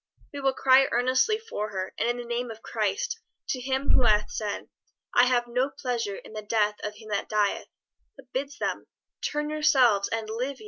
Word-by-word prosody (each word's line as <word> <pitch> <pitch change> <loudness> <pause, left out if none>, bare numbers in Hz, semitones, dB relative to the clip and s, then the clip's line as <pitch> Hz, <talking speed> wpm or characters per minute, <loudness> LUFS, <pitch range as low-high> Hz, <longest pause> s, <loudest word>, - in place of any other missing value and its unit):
We 285 - -5
will 270 -1 +2
cry 265 0 +6
earnestly 255 - +3
for 435 - -4
her, 190 -2 -4
and 235 - 0
in 240 - 0
the 245 - -6
name 240 +1 -2
of 225 0 -9
Christ, 455 - -1 0.3
to 255 - -1
Him 265 +2 0
who - - +5
hath 210 -3 +3
said, 210 -2 -3 0.5
'I 245 - +6
have 245 -1 +2
no 250 +3 +1
pleasure 245 -7 -3
in - - -11
the 215 - -4
death 210 0 +1
of 210 0 -4
him 215 0 -13
that 205 -1 -2
dieth,' 210 -2 +1 0.5
but 260 -2 -17
bids 280 +2 -3
them - - -3 0.3
'Turn 295 0 -2
yourselves 255 -9 +4
and 225 -1 -3
live 250 +5 -3
ye.'" - - -20
245 Hz, 200 wpm, -27 LUFS, 215-265 Hz, 0.5 s, cry